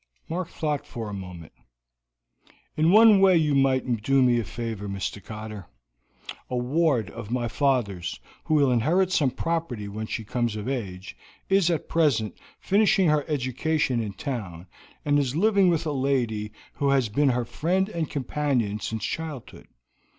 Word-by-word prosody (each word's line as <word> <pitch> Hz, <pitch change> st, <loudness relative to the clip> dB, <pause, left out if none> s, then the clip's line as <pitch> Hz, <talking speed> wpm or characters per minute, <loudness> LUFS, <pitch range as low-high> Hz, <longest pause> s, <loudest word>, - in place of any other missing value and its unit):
Mark 175 Hz, +1 st, -3 dB
thought 150 Hz, -3 st, -3 dB
for 115 Hz, -3 st, -6 dB
a -, -, -6 dB
moment. 90 Hz, -5 st, -8 dB, 1.2 s
"In 160 Hz, +2 st, +3 dB
one 215 Hz, 0 st, +7 dB
way 190 Hz, -2 st, +6 dB
you 155 Hz, -3 st, +2 dB
might 130 Hz, -4 st, +1 dB
do 135 Hz, +3 st, +3 dB
me 120 Hz, -1 st, +3 dB
a -, -, -1 dB
favor, 110 Hz, -2 st, -5 dB
Mr. 100 Hz, +1 st, -4 dB
Cotter. 110 Hz, -3 st, -8 dB, 0.8 s
A 125 Hz, -, -2 dB
ward 130 Hz, -1 st, +1 dB
of 115 Hz, -3 st, -8 dB
my 120 Hz, 0 st, -1 dB
father's, 115 Hz, -, -1 dB, 0.3 s
who 155 Hz, -, +1 dB
will 140 Hz, -3 st, +4 dB
inherit 170 Hz, +11 st, +2 dB
some 145 Hz, -7 st, +3 dB
property 135 Hz, -6 st, -3 dB
when 110 Hz, +2 st, -5 dB
she 110 Hz, -, -4 dB
comes 120 Hz, 0 st, -2 dB
of 105 Hz, +2 st, -5 dB
age, 100 Hz, -8 st, -5 dB, 0.3 s
is 195 Hz, -3 st, +3 dB
at 165 Hz, -3 st, -1 dB
present 140 Hz, -, +1 dB, 0.2 s
finishing 195 Hz, -3 st, +3 dB
her 150 Hz, -1 st, +2 dB
education 135 Hz, -1 st, 0 dB
in 105 Hz, -3 st, -4 dB
town, 95 Hz, -8 st, -5 dB, 0.4 s
and 145 Hz, 0 st, +3 dB
is 135 Hz, -1 st, -1 dB
living 200 Hz, +1 st, +4 dB
with 165 Hz, -1 st, 0 dB
a 155 Hz, -, -1 dB
lady 125 Hz, -6 st, -1 dB, 0.2 s
who 140 Hz, -, 0 dB
has 135 Hz, -3 st, +3 dB
been 140 Hz, +7 st, +2 dB
her 125 Hz, -1 st, 0 dB
friend 185 Hz, +9 st, 0 dB
and 170 Hz, -7 st, -3 dB
companion 130 Hz, -6 st, -1 dB
since 110 Hz, 0 st, -4 dB
childhood. 155 Hz, -6 st, -6 dB
130 Hz, 160 wpm, -25 LUFS, 110-155 Hz, 1.2 s, one